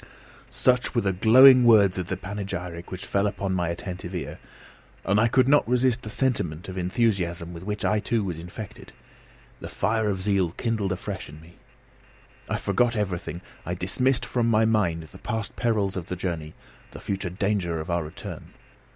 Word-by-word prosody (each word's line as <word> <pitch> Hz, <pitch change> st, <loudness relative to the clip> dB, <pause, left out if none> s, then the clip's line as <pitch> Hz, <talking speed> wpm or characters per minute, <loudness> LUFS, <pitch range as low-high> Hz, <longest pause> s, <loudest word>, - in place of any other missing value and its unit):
Such 125 Hz, 0 st, +1 dB
were 120 Hz, -, +3 dB
the 95 Hz, -2 st, 0 dB
glowing 125 Hz, +6 st, +8 dB
words 100 Hz, -6 st, +5 dB
of 90 Hz, -, -3 dB, 0.2 s
panegyric 95 Hz, -3 st, -5 dB
which 95 Hz, +2 st, -7 dB
fell 100 Hz, +1 st, +1 dB
upon 100 Hz, -1 st, -2 dB
my 90 Hz, -2 st, 0 dB
attentive 90 Hz, +1 st, -6 dB
ear, 90 Hz, -, -5 dB, 0.7 s
and 100 Hz, +2 st, +3 dB
I 115 Hz, -, +4 dB
could 130 Hz, +2 st, +3 dB
not 145 Hz, -4 st, +4 dB
resist 125 Hz, -1 st, +2 dB
the 110 Hz, -, -7 dB
sentiment 105 Hz, -, -1 dB
of 95 Hz, -, -6 dB
enthusiasm 90 Hz, -3 st, 0 dB
with 85 Hz, -, -8 dB
which 105 Hz, +2 st, -3 dB
I 105 Hz, -, +2 dB
too 115 Hz, +1 st, 0 dB
was 90 Hz, -4 st, -4 dB
infected. 90 Hz, +5 st, -9 dB, 0.7 s
The -, -, -7 dB
fire 110 Hz, 0 st, 0 dB
of 95 Hz, -2 st, -1 dB
zeal 95 Hz, -4 st, +1 dB
kindled 110 Hz, -4 st, -1 dB
afresh 95 Hz, -1 st, -5 dB
in 75 Hz, +1 st, -11 dB
me. 80 Hz, +2 st, -16 dB, 1.0 s
I -, -, 0 dB
forgot 120 Hz, -1 st, +1 dB
everything. 90 Hz, -5 st, -3 dB, 0.2 s
I 90 Hz, -, -3 dB
dismissed 125 Hz, +9 st, +1 dB
from 120 Hz, -2 st, 0 dB
my 110 Hz, 0 st, +4 dB
mind 95 Hz, -7 st, +1 dB
the -, -, -13 dB
past 110 Hz, -2 st, -4 dB
perils 105 Hz, -5 st, 0 dB
of 90 Hz, -3 st, -5 dB
the 90 Hz, -, -3 dB
journey, 85 Hz, -4 st, -4 dB, 0.3 s
the -, -, -10 dB
future 95 Hz, -2 st, -3 dB
danger 90 Hz, -3 st, -1 dB
of 80 Hz, +3 st, -5 dB
our 85 Hz, -1 st, 0 dB
return. 75 Hz, -, -9 dB
100 Hz, 175 wpm, -25 LUFS, 90-110 Hz, 1.0 s, glowing